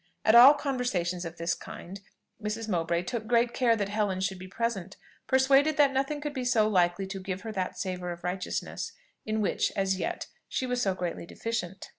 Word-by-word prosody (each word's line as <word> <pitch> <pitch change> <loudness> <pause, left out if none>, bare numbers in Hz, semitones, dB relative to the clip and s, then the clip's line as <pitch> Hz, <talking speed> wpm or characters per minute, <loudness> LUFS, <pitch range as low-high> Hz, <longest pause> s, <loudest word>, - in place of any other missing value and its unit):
At 220 - +5
all 250 +5 +10
conversations 220 - -1
of 165 +1 -7
this 170 +1 0
kind, 190 +3 -9 0.4
Mrs. 215 +1 -3
Mowbray 170 -3 0
took 220 +2 -4
great 235 0 +3
care 240 -3 +3
that 200 -2 -2
Helen 205 -3 0
should 190 0 -2
be 185 - -8
present, 195 -2 -3 0.3
persuaded 270 +3 +4
that 285 -2 +5
nothing 275 +3 0
could 295 -1 -4
be 260 -3 -3
so 235 -4 +3
likely 180 -2 +2
to 195 0 -6
give 190 0 -4
her 220 +1 -5
that 190 -3 -3
savour 180 -2 -3
of 170 0 -8
righteousness 180 +1 -3 0.3
in 215 0 0
which, 205 - +1
as 195 -1 +1
yet, - - -3 0.2
she 260 - -1
was 250 -1 -1
so 195 -5 +1
greatly 175 -2 -4
deficient. 195 -5 -4
205 Hz, 195 wpm, -28 LUFS, 185-245 Hz, 0.4 s, all